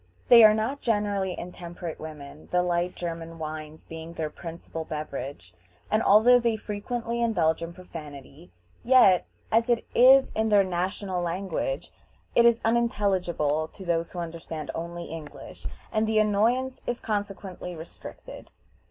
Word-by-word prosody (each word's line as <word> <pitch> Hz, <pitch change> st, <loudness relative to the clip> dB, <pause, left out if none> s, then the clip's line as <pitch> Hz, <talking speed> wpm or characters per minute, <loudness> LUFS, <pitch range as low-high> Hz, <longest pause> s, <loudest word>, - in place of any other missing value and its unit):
They 235 Hz, -2 st, +10 dB
are 215 Hz, 0 st, +8 dB
not 240 Hz, +6 st, -2 dB
generally 205 Hz, -4 st, 0 dB
intemperate 175 Hz, -1 st, -7 dB
women, 150 Hz, -1 st, -10 dB
the 180 Hz, 0 st, +3 dB
light 175 Hz, 0 st, 0 dB
German 165 Hz, -1 st, -5 dB
wines 155 Hz, 0 st, -7 dB
being 160 Hz, +1 st, -9 dB
their 155 Hz, -2 st, -3 dB
principal 165 Hz, -1 st, -7 dB
beverage, 140 Hz, -, -6 dB, 0.4 s
and 215 Hz, -, +3 dB
although 235 Hz, +4 st, +6 dB
they 235 Hz, -2 st, +1 dB
frequently 230 Hz, +3 st, -4 dB
indulge 170 Hz, -9 st, +2 dB
in 165 Hz, 0 st, -5 dB
profanity, 155 Hz, -3 st, -11 dB, 0.3 s
yet, 235 Hz, -8 st, +5 dB, 0.2 s
as 230 Hz, +2 st, +3 dB
it 235 Hz, -1 st, +2 dB
is 265 Hz, +2 st, +7 dB
in 220 Hz, 0 st, 0 dB
their 205 Hz, -2 st, +5 dB
national 185 Hz, +1 st, -2 dB
language, 175 Hz, -4 st, -3 dB, 0.4 s
it 235 Hz, -, +5 dB
is 235 Hz, -1 st, +5 dB
unintelligible 190 Hz, -10 st, +1 dB
to 190 Hz, +4 st, -12 dB
those 170 Hz, -1 st, 0 dB
who -, -, -10 dB
understand 165 Hz, -3 st, -5 dB
only 170 Hz, +1 st, -5 dB
English, 160 Hz, -2 st, -9 dB, 0.2 s
and 215 Hz, 0 st, +1 dB
the 220 Hz, 0 st, +1 dB
annoyance 225 Hz, +5 st, +2 dB
is 245 Hz, -, -1 dB
consequently 195 Hz, -4 st, -4 dB
restricted. 160 Hz, +1 st, -11 dB
180 Hz, 140 wpm, -27 LUFS, 165-220 Hz, 0.4 s, They